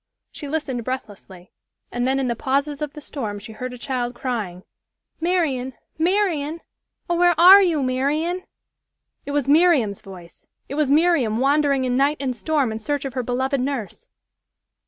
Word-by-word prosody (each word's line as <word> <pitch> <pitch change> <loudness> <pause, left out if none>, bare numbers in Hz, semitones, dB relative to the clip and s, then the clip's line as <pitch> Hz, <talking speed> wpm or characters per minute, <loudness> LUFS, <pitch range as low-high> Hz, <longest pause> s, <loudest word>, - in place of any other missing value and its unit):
She 290 - -8
listened 275 -5 -3
breathlessly 200 -7 -7 0.4
and 245 +1 -1
then 265 +1 +1
in 265 - 0
the 235 - -1
pauses 280 +4 -1
of 295 -1 -3
the 300 - -9
storm 225 -9 -5
she 220 +2 -10
heard 250 +4 -6
a 250 - -8
child 245 -1 -3
crying, 210 -9 -4 0.6
"Marian, 315 -7 0 0.3
Marian! 335 -4 0 0.5
Oh! 345 - 0
where 350 -1 +3
are 375 +4 +10
you, 330 -7 +1
Marian?" 295 +8 0 0.9
It - - -3
was 285 -2 0
Miriam's 290 - +3
voice! 180 -3 -13 0.2
It - - -7
was 300 -1 +1
Miriam 290 -7 +3
wandering 275 0 +2
in 250 0 0
night 285 +3 +2
and 260 -2 -2
storm 285 -2 0
in 220 - -4
search 285 +4 -2
of 270 - -4
her 255 - -1
beloved 260 +2 -1
nurse. 270 - -4
275 Hz, 165 wpm, -22 LUFS, 245-305 Hz, 0.9 s, are